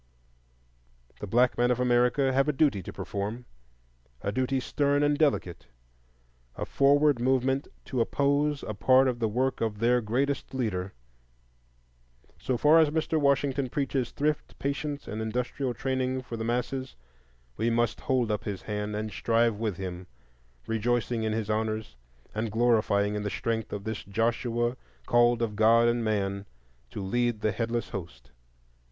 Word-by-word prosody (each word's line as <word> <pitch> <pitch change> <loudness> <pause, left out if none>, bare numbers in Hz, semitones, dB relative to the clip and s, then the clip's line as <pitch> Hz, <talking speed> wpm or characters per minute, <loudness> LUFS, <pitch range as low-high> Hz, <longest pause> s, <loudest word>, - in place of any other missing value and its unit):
The 105 - -5
black 120 +5 +2
men 120 0 +3
of 125 0 +1
America 125 +2 +3
have 135 +2 +3
a - - +1
duty 135 -8 +2
to - - -8
perform, 105 +5 -5 0.8
a 100 - -1
duty 130 +4 0
stern 145 +2 +1
and 145 0 +3
delicate,—a - - -4
forward 145 -1 +3
movement 130 +2 +1 0.2
to 130 -3 -1
oppose 145 +3 +1
a 110 - -4
part 130 +5 +4
of 125 -2 -1
the 115 - +1
work 130 +5 -1
of 110 -2 -1
their 120 +3 +3
greatest 135 +5 -1
leader. 95 -7 -2 1.5
So 130 - -1
far 150 +6 +6
as 160 -2 +5
Mr. 160 +1 0
Washington 140 -2 +1
preaches 135 -2 -1
Thrift, 150 +1 -2
Patience, 140 +1 -3
and 110 - -4
Industrial 125 +4 -2
Training 130 -1 -1
for 120 - -6
the 110 - -4
masses, 125 +3 -2 0.6
we 115 +2 0
must 120 -1 0
hold 125 -4 +1
up 105 - -2
his 100 -3 -4
hands 105 0 -3
and 105 0 -3
strive 115 +1 +1
with 105 -5 -2
him, 90 -1 -6 0.6
rejoicing 115 +1 0
in 110 -1 -1
his 110 -2 -2
honors 110 - -2 0.4
and 110 0 -2
glorying 110 -3 +2
in 105 - -2
the 105 - -2
strength 115 +1 -2
of 100 - -5
this 110 -1 -4
Joshua 120 +3 -1 0.3
called 120 - +3
of 105 -2 -2
God 115 +2 +5
and 120 0 +2
of 115 - -2
man 100 -2 -1 0.4
to 100 - -6
lead 120 +2 0
the 110 - +1
headless 115 +1 -2
host. 65 -8 -8
120 Hz, 155 wpm, -28 LUFS, 105-130 Hz, 1.5 s, far